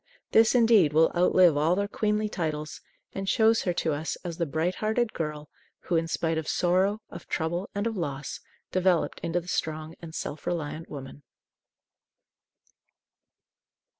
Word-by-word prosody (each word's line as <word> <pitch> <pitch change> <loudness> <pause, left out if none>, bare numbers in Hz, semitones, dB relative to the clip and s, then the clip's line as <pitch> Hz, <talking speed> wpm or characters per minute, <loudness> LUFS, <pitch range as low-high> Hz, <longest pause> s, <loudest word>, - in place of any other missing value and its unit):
This, 225 +2 +5
indeed, 225 -10 +5
will 160 +1 +5
outlive 180 -2 +5
all 155 +4 +2
their 200 +1 0
queenly 210 +1 0
titles, 155 -6 -4 0.3
and 195 0 -3
shows 225 +1 +4
her 180 - 0
to 160 - +2
us 155 +2 -3
as 170 -2 -6
the 170 - 0
bright 160 +5 0
hearted 220 +2 0
girl 150 -2 -4 0.3
who, 175 - -2
in 165 0 +1
spite 165 0 0
of 155 - -6
sorrow, 190 +4 +1
of 170 - -10
trouble, 175 +4 -2
and 205 +1 -1
of 230 -1 -1
loss, 140 -6 -4 0.3
developed 185 -2 +1
into 170 +1 -1
the 175 - -13
strong 155 -2 -3
and 165 -1 -9
self 145 - -5
reliant 165 -1 -3
woman. 135 0 -9
170 Hz, 155 wpm, -27 LUFS, 155-200 Hz, 0.3 s, This